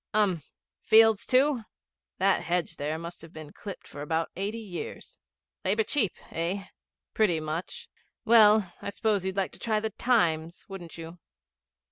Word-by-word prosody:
'Urn. 195 Hz, -6 st, +2 dB, 0.4 s
Fields, 220 Hz, -1 st, +5 dB
too?' 260 Hz, 0 st, +3 dB, 0.6 s
'That 195 Hz, +1 st, +3 dB
hedge 170 Hz, -1 st, -1 dB
there 150 Hz, +2 st, -2 dB
must 170 Hz, +1 st, -8 dB
have 165 Hz, 0 st, -12 dB
been 155 Hz, -2 st, -10 dB
clipped 200 Hz, -2 st, -8 dB
for 145 Hz, -, -9 dB
about 160 Hz, +2 st, -1 dB
eighty 200 Hz, +4 st, -3 dB
years.' 200 Hz, -6 st, -7 dB, 0.4 s
'Labour 210 Hz, +4 st, +2 dB
cheap 210 Hz, -, +1 dB, 0.2 s
eh?' 175 Hz, +4 st, -2 dB, 0.5 s
'Pretty 185 Hz, -7 st, +2 dB
much. 155 Hz, +4 st, -5 dB, 0.4 s
Well, 215 Hz, -5 st, +6 dB
I -, -, -4 dB
suppose 205 Hz, -1 st, 0 dB
you'd 190 Hz, +1 st, -3 dB
like 195 Hz, -, 0 dB
to -, -, -11 dB
try 215 Hz, -2 st, 0 dB
the 220 Hz, 0 st, -3 dB
Times, 175 Hz, -8 st, +1 dB
wouldn't 180 Hz, -5 st, -9 dB
you?' 165 Hz, +1 st, -9 dB
190 Hz, 150 wpm, -28 LUFS, 165-215 Hz, 0.6 s, Well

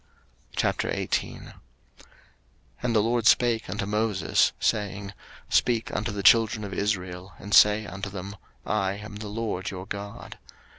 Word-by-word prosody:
03:018:001 -, -, -1 dB, 1.3 s
And 120 Hz, -1 st, 0 dB
the 105 Hz, -, +4 dB
LORD 115 Hz, 0 st, +1 dB
spake 120 Hz, -2 st, +3 dB
unto 100 Hz, -1 st, -2 dB
Moses, 105 Hz, -1 st, +1 dB
saying, 100 Hz, -1 st, -1 dB, 0.4 s
03:018:002 -, -, -4 dB
Speak 115 Hz, -2 st, +2 dB
unto 105 Hz, +1 st, -1 dB
the 100 Hz, -1 st, -4 dB
children 110 Hz, -1 st, +5 dB
of 100 Hz, -2 st, -6 dB
Israel, 95 Hz, -2 st, -3 dB
and 100 Hz, +2 st, -7 dB
say 105 Hz, +1 st, +6 dB
unto 100 Hz, 0 st, -6 dB
them, 100 Hz, +1 st, -7 dB, 0.3 s
I 100 Hz, -3 st, 0 dB
am 105 Hz, +1 st, -8 dB
the 105 Hz, 0 st, -7 dB
LORD 105 Hz, -3 st, -3 dB
your 95 Hz, -1 st, -7 dB
God. 100 Hz, 0 st, -7 dB
105 Hz, 140 wpm, -26 LUFS, 100-110 Hz, 1.3 s, say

